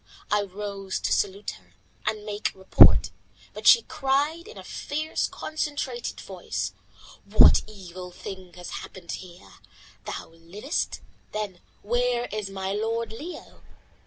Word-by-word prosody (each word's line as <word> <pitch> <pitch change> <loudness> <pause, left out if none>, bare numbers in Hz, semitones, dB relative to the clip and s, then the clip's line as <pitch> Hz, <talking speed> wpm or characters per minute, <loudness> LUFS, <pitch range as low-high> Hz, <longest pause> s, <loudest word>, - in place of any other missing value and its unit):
I 210 0 +4
rose 200 -1 -4
to - - +1
salute 200 +1 0
her, - - -27 0.3
and 210 -1 -1
make 210 0 -1
report, 190 0 +7 0.4
but - - -3
she 465 - +9
cried 300 +3 0
in 450 - -11
a - - -8
fierce, 310 +2 -2
concentrated 290 -6 -3
voice 105 - -4 0.5
"What 205 +2 +7
evil 185 -3 -9
thing 185 0 -8
has 180 -1 -8
happened 175 -3 -9
here? 180 0 -9 0.5
Thou - - -5
livest; 175 - -3 0.3
then 205 -4 -3 0.2
where 240 +2 +1
is 210 -2 -3
my 190 0 -3
lord 225 +2 -1
Leo? 305 +11 -8
210 Hz, 130 wpm, -27 LUFS, 190-245 Hz, 0.5 s, she